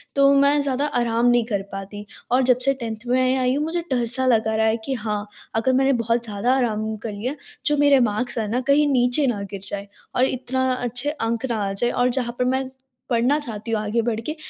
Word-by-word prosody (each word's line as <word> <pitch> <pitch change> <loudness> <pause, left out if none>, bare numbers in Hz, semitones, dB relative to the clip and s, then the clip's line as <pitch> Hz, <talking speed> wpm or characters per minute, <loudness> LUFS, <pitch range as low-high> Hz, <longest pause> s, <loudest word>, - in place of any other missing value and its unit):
तो 275 0 +5
मैं 280 +1 +4
ज़्यादा 280 +1 0
आराम 240 -4 0
नहीं 240 -1 +4
कर 205 -4 -1
पाती 200 +1 -7 0.3
और 255 +1 +4
जब 250 -1 +4
से 275 - +4
10th 230 -3 -6
में 255 +1 +2
या 260 - 0
आई 250 0 +2
हूँ 295 - 0
मुझे 340 +2 -2
डर-सा 245 +1 0
लग 225 -3 +3
रहा 220 0 +1
है 220 +1 +2
कि 270 - -2
हाँ, 210 -3 -3 0.3
अगर 255 +4 +2
मैंने 270 +1 +3
बहुत 230 0 0
ज़्यादा 215 +4 0
आराम 220 -3 -1
कर 225 - -3
लिया, 250 +8 -4 0.3
जो 295 -1 +2
मेरे 285 -2 +5
मार्क्स 240 +4 -3
है 220 -2 -1
ना 250 +2 0
कहीं 290 +1 +4
नीचे 250 +2 +3
ना 210 -5 -1
गिर 195 -1 -6
जाएँ, 200 0 -5 0.3
और 255 - +4
इतना 260 0 -1
अच्छे 245 +3 -2
अंक 235 -3 -2
ना 220 -3 -1
आ - - -2
जाए 240 +5 0
और 245 0 +2
जहाँ 245 -1 -2
पर 250 - +2
मैं, 260 +1 0 0.4
पढ़ना 245 +5 +2
चाहती 230 -5 -6
हूँ 220 - +1
आगे 215 +2 0
बढ़के 230 +6 -3
245 Hz, 230 wpm, -22 LUFS, 220-260 Hz, 0.4 s, तो